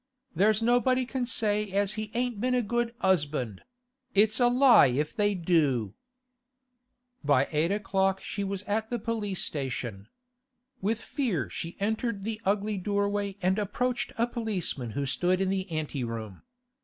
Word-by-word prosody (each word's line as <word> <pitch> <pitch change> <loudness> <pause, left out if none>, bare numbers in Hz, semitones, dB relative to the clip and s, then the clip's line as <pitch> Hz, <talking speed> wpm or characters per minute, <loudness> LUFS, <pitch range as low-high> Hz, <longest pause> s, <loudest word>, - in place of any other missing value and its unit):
'There's 215 +3 +3
nobody 250 +2 +3
can 255 -1 -2
say 210 -3 0
as 200 +1 +1
he 215 0 -4
ain't 245 -3 -1
been 250 +1 +2
a 250 - +2
good 240 +1 -1
'usband; 145 - +1 0.5
it's 215 +3 +4
a 245 - +5
lie 250 - +7
if 145 +5 -1
they 205 -1 +2
do.' 150 - +1 1.3
By 140 -2 +3
eight 160 +3 +1
o'clock 195 -2 +1
she 200 - -3
was 195 0 -3
at 220 +2 -1
the 240 - -1
police 215 -4 -2
station. 120 -8 -4 0.7
With 215 +3 0
fear 180 - -2
she 165 - -5
entered 220 0 -1
the 220 +1 -4
ugly 205 +1 0
doorway 200 0 -1
and 190 +3 +2
approached 240 +5 -1
a 230 - +3
policeman 195 - -3
who 140 - 0
stood 180 +7 +1
in 190 -1 +1
the 190 0 -2
ante 155 -4 -3
room. 110 -4 -6
200 Hz, 155 wpm, -28 LUFS, 160-225 Hz, 1.3 s, lie